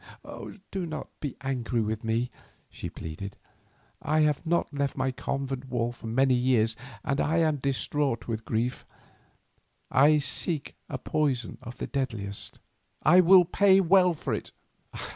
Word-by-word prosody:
"Do 190 -3 -3
not 155 -1 -6
be 145 -4 -4
angry 125 -3 -1
with 110 +1 -2
me," 115 +2 0 0.4
she - - -6
pleaded; 100 +5 -7 0.6
"I 155 +1 +2
have 150 +2 +1
not 170 -2 +1
left 140 -1 -1
my 130 0 +1
convent 135 0 -3
walls 120 -1 -1
for 115 - -8
many 130 +3 +3
years 120 -3 +3 0.3
and 140 -2 0
I 160 +3 +1
am 160 -3 +3
distraught 140 -2 -1
with 115 -1 -3
grief. 115 +3 -1 1.1
I 150 +3 +6
seek 150 +1 -1
a - - -3
poison 140 -7 -1
of 120 +1 -9
the - - -3
deadliest. 110 -8 -3 0.4
I 180 - +7
will 180 0 +7
pay 195 +2 +5
well 180 -1 +5
for - - -3
it." - - -4
135 Hz, 145 wpm, -28 LUFS, 120-155 Hz, 1.1 s, I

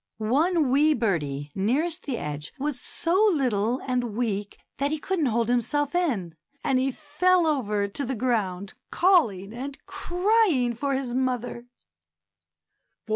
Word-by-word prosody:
One 285 - +2
wee 300 +3 +4
birdie 150 - -2
nearest 285 - 0
the 260 -4 -1
edge 150 -2 -5
was 280 -2 -2
so 355 +5 +1
little 245 - 0
and 245 -4 -1
weak 210 -4 -2 0.2
that 280 +1 +1
he 310 - -1
couldn't 330 -1 -1
hold 230 -1 +1
himself 270 +4 0
in, 245 - 0 0.3
and 260 -1 +2
he 265 +1 +1
fell 330 +5 +2
over 210 -10 0
to 240 +8 -3
the 265 +1 -2
ground 200 -6 -1 0.2
calling 230 - +2
and 270 +4 -6
crying 380 - +1
for 275 +4 -1
his 260 -2 -3
mother. 245 -2 -2
255 Hz, 135 wpm, -26 LUFS, 215-305 Hz, 0.3 s, wee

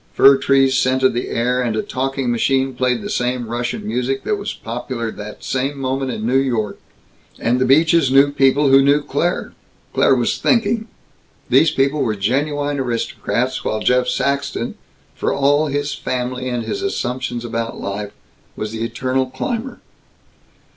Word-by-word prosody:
Fir 135 0 +7
trees 135 -1 +3
scented 130 0 +2
the 120 - -3
air, 125 +2 0
and 120 -3 -1
a 110 - -1
talking 135 -1 -2
machine 135 +3 +1
played 125 -2 0
the - - -4
same 125 0 -1
Russian 120 +2 -3
music 125 +4 -1
that 210 - 0
was 200 0 -4
popular 115 0 -5
that 105 0 -9
same 135 +2 -2
moment 135 0 -2
in 110 -3 -4
New 130 +3 +3
York. 115 -6 -1 0.6
And 125 +2 0
the - - +4
Beaches 160 +1 +4
knew 140 +1 +5
people 140 0 +3
who 135 0 +7
knew 145 +2 +3
Claire. 170 +6 -1 0.4
Claire - - +4
was - - 0
thinking. 225 -1 +1 0.6
These 140 +6 +5
people 140 0 +1
were 110 -5 0
genuine 145 +7 -1
aristocrats, 125 +1 -2
while 110 - -1
Jeff 125 +3 +2
Saxton, 140 -2 -1 0.4
for - - -1
all 145 +2 +2
his 145 0 -2
family 125 0 -3
and 120 -2 -2
his 395 - -4
assumptions 125 - -3
about 115 0 -3
life, 100 +1 -4 0.4
was 105 0 -4
the 115 0 -4
eternal 130 +3 -1
climber. 240 - -4
130 Hz, 160 wpm, -19 LUFS, 120-140 Hz, 0.6 s, Fir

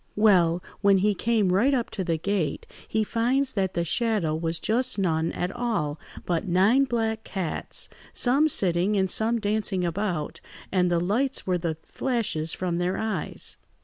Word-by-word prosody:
"Well, 180 -5 +4 0.2
when 200 -1 +4
he 205 +2 +2
came 210 -3 +1
right 255 +9 +3
up 240 -3 -2
to 190 - -3
the 165 -2 0
gate 175 -3 -2 0.2
he 220 0 0
finds 250 +5 0
that 190 -3 -1
the 170 - 0
shadow 210 -5 +1
was 165 +1 -1
just 245 +6 0
none 165 -4 +1
at 180 +1 -3
all, 215 -12 -1 0.3
but 175 +1 -1
nine 200 +10 +4
black 225 -3 -1
cats, 185 -5 -3 0.2
some 275 +5 +3
sitting 185 - +1
and 190 -1 +1
some 230 +2 +2
dancing 210 -3 0
about, 175 -3 -2 0.3
and 180 -2 +2
the 175 -1 +2
lights 235 +10 0
were 180 -1 0
the 165 -2 -2
flashes 220 -11 -1
from 175 -1 -1
their 180 +1 0
eyes. 215 -8 -2
195 Hz, 165 wpm, -26 LUFS, 175-225 Hz, 0.3 s, Well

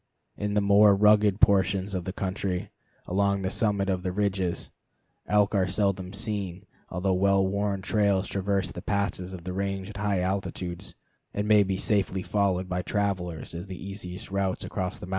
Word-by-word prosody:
In 105 0 -2
the 105 - +4
more 100 0 +6
rugged 105 0 +4
portions 100 -2 +3
of 90 -2 -3
the 95 - -2
country 95 -1 -3 0.3
along 100 +1 +1
the 95 - -1
summit 100 -3 +1
of 95 -2 0
the 90 -1 -2
ridges, 95 -2 -1 0.6
elk 105 0 +3
are 95 -3 +2
seldom 95 -1 0
seen, 100 -4 -4 0.2
although 95 +2 0
well 95 +1 +3
worn 100 0 -1
trails 100 -1 +2
traverse 100 -1 -1
the - - -7
passes 100 -2 -1
of 90 -3 -8
the 90 +1 -4
range 95 +1 -3
at 100 - -9
high 100 -2 0
altitudes, 95 -1 -3 0.4
and 105 +1 -1
may 105 -1 +6
be 95 -1 0
safely 95 -2 +1
followed 95 -3 0
by 90 0 -1
travelers 90 -6 -2
as 85 +3 -6
the 95 -1 -7
easiest 95 -1 -7
routes 95 -1 -1
across 95 0 -3
the - - -8
mountains. - - -12
95 Hz, 180 wpm, -27 LUFS, 95-100 Hz, 0.6 s, more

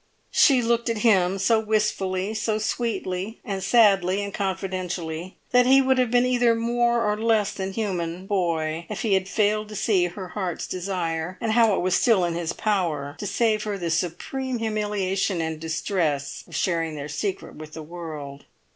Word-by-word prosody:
She 260 -5 +5
looked 235 +1 +1
at 230 - 0
him 190 -4 +4
so 210 +4 +3
wistfully, 210 -2 0
so 215 0 -1
sweetly 215 -2 -2
and 195 -4 -3
sadly 200 -4 +4
and 200 0 -5
confidentially, 185 -3 -3
that 250 0 +5
he 270 +1 +7
would 265 -1 +3
have 250 -2 +2
been 245 +1 +3
either 245 -2 +3
more 235 0 +1
or 210 - +1
less 220 -2 +1
than 190 0 -4
human 185 -4 -3
boy 170 -4 -1
if 210 - -4
he 215 -4 +2
had 190 0 +1
failed 215 0 +1
to 210 - -8
see 190 -3 +2
her 185 +1 -8
heart's 185 -4 -3
desire, 180 -2 -3
and 225 -2 -1
how 225 -3 +4
it - - -1
was 185 0 +1
still 210 -7 +4
in 170 - -1
his 170 0 -2
power 165 -9 -1
to 205 - -3
save 215 +2 +1
her 210 -2 -3
the 170 -3 -3
supreme 240 +10 -2
humiliation 205 -4 -1
and 160 -1 -3
distress 160 -3 -2
of 170 - -10
sharing 165 -3 0
their 145 -1 -5
secret 185 +7 -4
with 155 0 -10
the 160 - -7
world. 150 -4 -8
195 Hz, 180 wpm, -24 LUFS, 175-220 Hz, -, he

